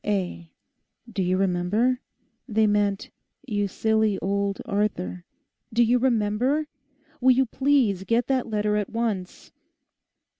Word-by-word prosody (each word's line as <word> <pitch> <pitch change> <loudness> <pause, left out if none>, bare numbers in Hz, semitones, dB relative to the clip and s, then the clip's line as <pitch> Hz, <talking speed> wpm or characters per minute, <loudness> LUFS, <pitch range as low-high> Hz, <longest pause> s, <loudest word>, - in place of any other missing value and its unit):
O.A."—do 195 +2 -5
you 185 0 +1
remember? 195 +7 +1 0.5
They 220 -2 +2
meant, 205 -1 0 0.3
You 205 -5 -1
Silly 220 0 +1
Old 200 0 -1
Arthur!—do 210 +4 -3
you 240 +2 +3
remember? 245 +4 +1 0.5
Will 255 0 +5
you 265 +1 +3
please 255 -7 +1
get 235 +3 +2
that 260 -3 0
letter 210 -1 0
at 205 -2 -2
once? 220 -6 -3
210 Hz, 110 wpm, -25 LUFS, 200-245 Hz, 0.5 s, Will